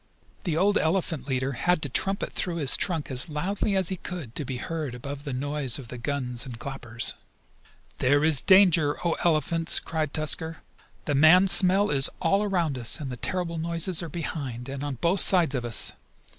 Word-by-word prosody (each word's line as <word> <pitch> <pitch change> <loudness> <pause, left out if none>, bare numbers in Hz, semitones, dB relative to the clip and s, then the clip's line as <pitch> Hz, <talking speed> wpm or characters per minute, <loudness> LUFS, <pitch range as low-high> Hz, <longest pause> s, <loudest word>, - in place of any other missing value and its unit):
The 165 -4 -1
old 200 +4 +2
elephant 160 -5 -2
leader 130 0 -2
had 175 +7 0
to - - -1
trumpet 195 +9 -2
through 175 -2 -3
his 145 -5 +3
trunk 165 -6 -3
as 130 +4 +2
loudly 195 +6 -2
as 190 -3 +4
he 190 - -4
could 165 -10 -8
to 150 - -3
be 130 -1 -5
heard 155 -2 -5
above 140 +4 -8
the 140 - -4
noise 140 0 -1
of 130 -5 -10
the 125 - -8
guns 125 -2 -3
and 125 -4 -8
clappers. 120 -4 -2 0.9
"There 145 +3 +2
is 155 -5 +5
danger, 175 -5 +4
O 170 - +2
Elephants!" 165 0 +2
cried 155 -3 -4
Tusker. 160 +2 -1 0.5
"The 145 - -1
man 160 +7 +5
smell 190 +3 +3
is 135 -2 +4
all 195 +5 +1
around 175 -10 -1
us, 115 +6 +1
and 140 -4 -6
the - - -5
terrible 170 +5 -3
noises 170 +2 +2
are 170 - -6
behind, 135 -6 -6
and 135 +1 -6
on 145 -2 -4
both 170 - 0
sides 175 -7 +5
of 125 -3 -3
us. 120 -1 0
155 Hz, 190 wpm, -25 LUFS, 135-175 Hz, 0.9 s, is